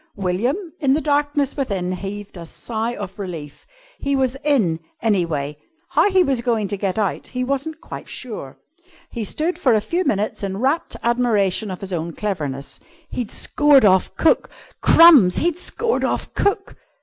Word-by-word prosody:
William, 240 - -2
in 275 -3 +3
the - - +1
darkness 290 -2 0
within, 195 -10 -2
heaved 200 +2 -6
a 170 - -8
sigh 230 +6 -4
of 200 0 -7
relief. 165 -7 -7 0.3
He 280 0 0
was 260 -1 +1
in, 220 - +2 0.2
anyway; 165 -9 0 0.3
how - - +3
he 375 -2 +4
was 270 -7 +1
going 230 -4 0
to 200 - -1
get 195 -1 -2
out 205 -4 -1
he 250 0 -3
wasn't 280 +5 -3
quite - - -9
sure. 215 - -7 0.5
He 235 - -4
stood 315 - -2
for 250 -5 +4
a - - +4
few 340 - -1
minutes 210 - -1
in 195 -1 -3
rapt 270 +9 0
admiration 220 -4 +1
of 185 - -6
his 195 -1 -5
own 170 0 -3
cleverness. 150 -10 -4 0.3
He'd 245 -4 -4
scored 290 -5 +4
off 190 -2 +3
cook! 325 - +2 0.3
Crumbs! 295 - +7
He'd 345 +1 0
scored 465 +5 -1
off - - -2
cook! 400 0 0
225 Hz, 165 wpm, -21 LUFS, 190-285 Hz, 0.5 s, Crumbs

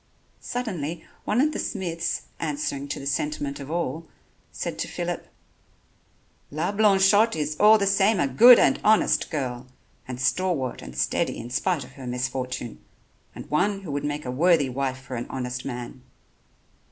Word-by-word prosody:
Suddenly, 175 - -4 0.2
one 215 - +1
of 305 +2 +2
the - - -4
smiths, 170 -5 -3 0.2
answering 145 -3 -3
to - - -4
the 135 - -8
sentiment 145 0 -2
of 140 0 -8
all, 165 -1 -3 0.4
said - - -5
to - - -2
Phillip: - - -4 1.2
"La 160 +6 -2
Blanchotte 205 +1 +4
is 150 -1 -2
all 215 +1 +7
the 200 - 0
same 195 +1 +3
a 140 - +2
good 235 - +8
and - - +3
honest 215 0 +3
girl, 125 -5 -4 0.4
and 125 -1 -6
stalwart 130 0 0
and 65 0 -10
steady 65 0 0
in 120 - -8
spite 160 +3 0
of 125 - -13
her 130 -1 -10
misfortune, 125 -1 -4 0.5
and - - -9
one 195 +6 +1
who 175 -6 -7
would 140 0 -2
make 145 0 -3
a 125 - -3
worthy 155 0 +3
wife 130 0 -2
for 130 0 -8
a 120 - -5
honest 125 -1 -4
man." 125 0 -6
145 Hz, 165 wpm, -25 LUFS, 130-190 Hz, 1.2 s, good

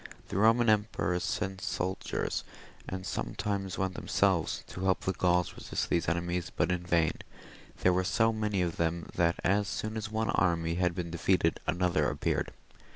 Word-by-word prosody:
The - - -5
Eoman 115 +4 +4
emperors 100 -5 +1
sent 95 -2 -2
soldiers, 95 +2 -2 0.5
and 95 0 -5
sometimes 100 -1 -2
went 95 -1 -1
themselves, - - +1
to 95 - -6
help 95 -1 +2
the 95 - -1
Gauls 90 -1 +2
to - - -14
resist - - -3
these 85 -2 +2
enemies, 85 +1 -1
but 90 - 0
in 90 -1 0
vain; 85 -2 +2 0.7
there 90 - +4
were 90 +1 +2
so 110 +4 +2
many 105 -4 0
of 85 -2 -2
them, 85 0 -1
that 85 -1 +2
as 100 +2 +2
soon 110 +1 -3
as 110 0 -3
one 110 0 0
army 85 -2 +1
had 90 0 +1
been 85 -2 -4
defeated, 85 0 +2
another 90 +2 +2
appeared. - - -1
90 Hz, 170 wpm, -30 LUFS, 85-100 Hz, 0.7 s, Eoman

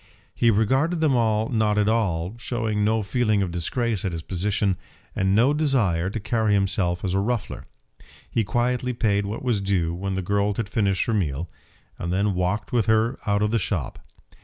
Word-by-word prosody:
He 115 - +3
regarded 130 - +2
them 155 -4 +3
all 110 -2 +1
not 110 -3 +1
at 105 -1 +2
all, 100 -5 0
showing 110 -4 -1
no 110 +1 +1
feeling 110 -1 +1
of 90 - -3
disgrace 105 +5 -1
at 95 -4 -2
his 80 -1 -5
position, 95 +1 0 0.4
and 95 0 +1
no 125 +7 +4
desire 115 - +1
to 110 - -4
carry 110 -1 +1
himself 95 -2 0
as 90 - -1
a 95 - +2
ruffler. 115 +1 -3 0.6
He 115 - 0
quietly 125 +4 0
paid 105 -4 +1
what 110 +5 -5
was 120 -6 0
due 90 -4 0
when 95 +2 -3
the 95 - -2
girl 100 +2 0
had 110 -2 -3
finished 100 -3 +1
her 115 - -1
meal, 80 -5 -1 0.5
and 85 - -3
then 100 +2 +1
walked 90 +3 -1
with 115 -5 +2
her 110 +3 +2
out 100 0 +2
of 105 - +1
the 115 - +2
shop. 90 - -3
105 Hz, 190 wpm, -24 LUFS, 95-115 Hz, 0.6 s, no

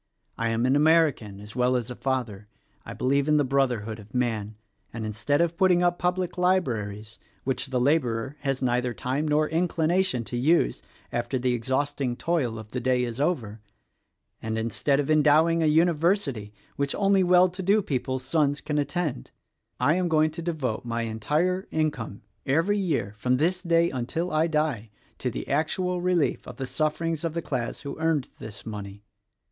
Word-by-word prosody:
I 115 0 -1
am 115 +2 +1
an 130 +2 +3
American, 150 -10 +3
as 105 +1 -11
well 125 0 +2
as 125 -1 -2
a - - -6
father. 120 -7 -3 0.4
I - - -6
believe 140 +2 +1
in 150 0 +4
the 145 - +3
Brotherhood 125 -5 0
of 105 +3 -13
Man, 110 -4 -1 0.4
and 115 -2 -5
instead 110 +8 0
of 170 -1 +1
putting 180 -1 +3
up 175 0 +1
public 180 0 -1
libraries 115 - -1 0.2
which 135 +2 -1
the 130 -1 -1
laborer 130 -2 +1
has 135 -2 -2
neither 125 -1 0
time 135 +7 -2
nor 150 +1 +2
inclina 170 +2 +1
tion 125 -11 -2
to 120 - -5
use 125 - +2 0.3
after 120 +2 -1
the 125 0 0
exhausting 130 +1 -1
toil 135 -8 -1
of 110 0 -10
the 125 - -2
day 125 0 +1
is 120 +2 -3
over, 115 -10 -1 0.8
and 110 0 -3
instead 115 +5 0
of 145 +1 0
endowing 155 +2 +4
a 160 - +3
University 160 - +2 0.3
which 140 -1 -1
only 195 -1 +3
well 180 0 +5
to 180 +2 -7
do 200 +3 +3
people's 130 -2 -2
sons 145 0 +1
can 150 0 -2
attend, 145 - -2 0.5
I 140 +5 +3
am 180 -1 +1
going 155 -1 +3
to 160 - -6
devote 155 -9 -2
my 115 -1 -2
entire 150 - -1
income, 145 -11 -2 0.2
every 165 +9 +1
year, 145 - -1
from 125 +2 +2
this 180 +6 +1
day 170 -1 +2
until 150 +8 -2
I 155 +2 +2
die, 150 -9 -1 0.3
to - - -1
the - - -6
actual 180 +5 0
relief 180 -4 0
of - - -9
the 135 - -3
sufferings 155 +3 -1
of 165 -1 -2
the 170 - -2
class 125 -4 -3
who 140 +1 -7
earned 160 -4 0
this 105 -2 -9
money. 105 -2 -7
140 Hz, 180 wpm, -26 LUFS, 120-165 Hz, 0.8 s, well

